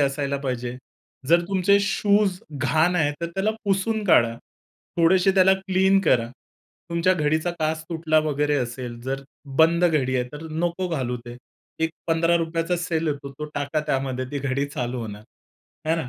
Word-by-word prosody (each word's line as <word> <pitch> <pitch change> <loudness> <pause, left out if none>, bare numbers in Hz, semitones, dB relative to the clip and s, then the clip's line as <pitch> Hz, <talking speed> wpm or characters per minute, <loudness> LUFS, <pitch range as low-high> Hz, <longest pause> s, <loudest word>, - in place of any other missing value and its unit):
असायला 140 0 0
पाहिजे. 125 -2 -3 0.5
जर 170 +2 +6
तुमचे 195 +1 +3
शूज 200 -1 +2
घाण 155 +5 +2
आहे 150 -3 +2
तर 170 - -1
त्याला 195 +5 0
पुसून 205 +2 0
काढा. 115 - +4 0.6
थोडेशे 180 +3 +4
त्याला 190 0 +6
क्लीन 190 0 +2
करा. 120 -10 +2 0.6
तुमच्या 170 +2 +2
घडीचा 155 +1 0
काच 155 0 -1
तुटला 160 -1 +2
वगैरे 150 -1 0
असेल 120 -1 -5
जर 135 +2 -3 0.4
बंद 170 +2 +5
घडी 145 -7 +2
आहे 125 - +1
तर 150 +2 -8
नको 175 +3 -1
घालू 130 -7 -2
ते. 120 0 -8 0.5
एक 160 - -1 0.2
₹15चा 165 +1 +1
सेल 170 -2 -1
येतो 140 -1 -4
तो 150 - -3
टाका 145 +2 -1
त्यामध्ये 135 -2 -1
ती 145 - -3
घडी 140 0 -1
चालू 125 -3 -4
होणार 105 -2 -7 0.7
है 160 - +4
ना. 160 -6 -3
160 Hz, 155 wpm, -24 LUFS, 135-175 Hz, 0.7 s, जर